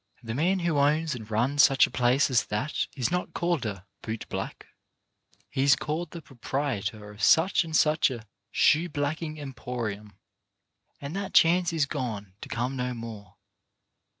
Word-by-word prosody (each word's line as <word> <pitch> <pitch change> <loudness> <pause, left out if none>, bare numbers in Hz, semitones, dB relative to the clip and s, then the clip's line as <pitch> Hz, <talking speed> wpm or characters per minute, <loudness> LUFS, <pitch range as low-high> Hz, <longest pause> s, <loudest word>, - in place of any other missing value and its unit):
The 115 -1 -4
man 180 +8 +1
who 170 -4 +1
owns 150 +2 +2
and 110 -4 -8
runs 125 +7 +2
such 135 0 +6
a - - -9
place 125 +3 +2
as 125 - +3
that 105 +9 -2
is 130 -1 -1
not 180 0 -2
called 170 -9 0
a 95 -3 -6 0.2
''boot 110 0 -5
black"; - - -5 0.8
he 135 +1 -2
is 140 0 +6
called 155 +2 -3
the 170 0 -9
proprietor 115 -5 -3
of 105 +1 -12
such 175 +4 +4
and 160 -1 -5
such 155 0 +4
a 120 -3 -7 0.2
"Shoe 165 +4 +3
blacking 155 +1 -3
Emporium." 120 -7 -5 0.8
And 140 +4 -6
that 195 -1 -4
chance 175 +1 +5
is 160 -3 +1
gone 110 -10 -4
to - - -8
come 125 +4 -2
no 125 -1 -2
more. 110 -4 -9
135 Hz, 165 wpm, -27 LUFS, 115-155 Hz, 0.8 s, such